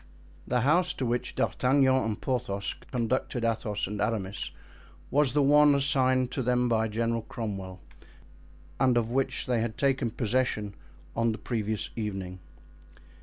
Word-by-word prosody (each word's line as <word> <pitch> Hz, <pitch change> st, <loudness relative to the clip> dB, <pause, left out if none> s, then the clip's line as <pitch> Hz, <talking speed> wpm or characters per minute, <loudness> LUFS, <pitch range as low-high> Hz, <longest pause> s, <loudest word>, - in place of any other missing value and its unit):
The 125 Hz, 0 st, +1 dB
house 160 Hz, +7 st, +3 dB
to 130 Hz, -, -3 dB
which 120 Hz, +1 st, -2 dB
D'Artagnan 130 Hz, +1 st, +3 dB
and 110 Hz, -5 st, 0 dB
Porthos 100 Hz, -6 st, -2 dB, 0.2 s
conducted 120 Hz, 0 st, -1 dB
Athos 110 Hz, -2 st, -1 dB
and 105 Hz, +1 st, -4 dB
Aramis 100 Hz, -3 st, -2 dB, 0.6 s
was 145 Hz, -2 st, +3 dB
the 145 Hz, -1 st, +3 dB
one 145 Hz, +1 st, +6 dB
assigned 130 Hz, -2 st, +2 dB
to 135 Hz, -, -2 dB
them 125 Hz, 0 st, +2 dB
by 110 Hz, -1 st, +2 dB
General 115 Hz, +1 st, -1 dB
Cromwell 95 Hz, -5 st, -6 dB, 1.0 s
and 125 Hz, -1 st, +4 dB
of 115 Hz, -1 st, 0 dB
which 135 Hz, +1 st, 0 dB
they 125 Hz, -3 st, +1 dB
had 115 Hz, -1 st, -3 dB
taken 135 Hz, -3 st, +1 dB
possession 110 Hz, -3 st, -1 dB, 0.4 s
on 115 Hz, 0 st, +2 dB
the -, -, -5 dB
previous 110 Hz, -3 st, -2 dB
evening. 95 Hz, -4 st, -4 dB
120 Hz, 140 wpm, -28 LUFS, 110-130 Hz, 1.0 s, one